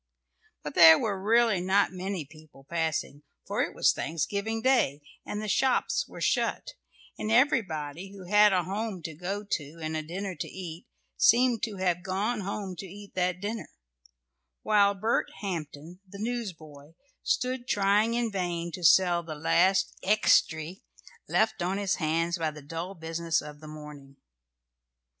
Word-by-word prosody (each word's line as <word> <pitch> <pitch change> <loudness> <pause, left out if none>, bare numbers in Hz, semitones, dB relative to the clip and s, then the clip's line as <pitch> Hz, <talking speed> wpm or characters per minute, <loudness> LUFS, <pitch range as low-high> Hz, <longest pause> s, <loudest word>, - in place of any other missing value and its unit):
] - - -39
But 150 - -5
there 160 -1 +9
were 200 -4 -2
really 225 -2 +3
not 190 +2 +2
many 185 -3 -4
people 155 -2 -17
passing, 160 -3 -2 0.2
for - - -1
it - - -2
was - - +4
Thanksgiving 200 +8 -2
Day, 235 - +2 0.2
and 210 - -3
the 215 - -4
shops 265 - +1
were - - -11
shut, - - 0 0.5
and 215 - -2
everybody 195 - +1
who 195 -2 -11
had 210 +2 +5
a 185 -2 +2
home 195 -1 -4
to 160 0 -5
go 190 +6 -4
to 160 -5 -4
and 160 0 -4
a 155 - -1
dinner 185 +5 -5
to - - -4
eat 175 -2 -8 0.3
seemed 240 -1 +4
to 215 -3 -7
have 180 -2 0
gone 200 +6 -1
home 195 -1 -4
to 195 - -7
eat 200 +2 -12
that 180 -1 0
dinner, 215 +3 -4 0.9
while 200 -1 +4
Bert 220 +4 0
Hampton, 170 -3 -6
the 200 - -10
newsboy, 165 -11 -6 0.3
stood 250 0 -1
trying 205 +3 +2
in 235 -2 0
vain 175 -3 -2
to 180 - -7
sell 175 +2 +5
the 160 -2 -7
last 185 +5 +2
"extry" 185 -4 +2 0.5
left 220 -2 +1
on 185 +3 -1
his 200 -1 0
hands 165 +2 0
by 160 -1 0
the 150 -1 -11
dull 165 +6 -6
business 165 0 -1
of 150 0 -9
the 155 - -11
morning. 150 -2 -11
185 Hz, 160 wpm, -28 LUFS, 160-210 Hz, 0.9 s, there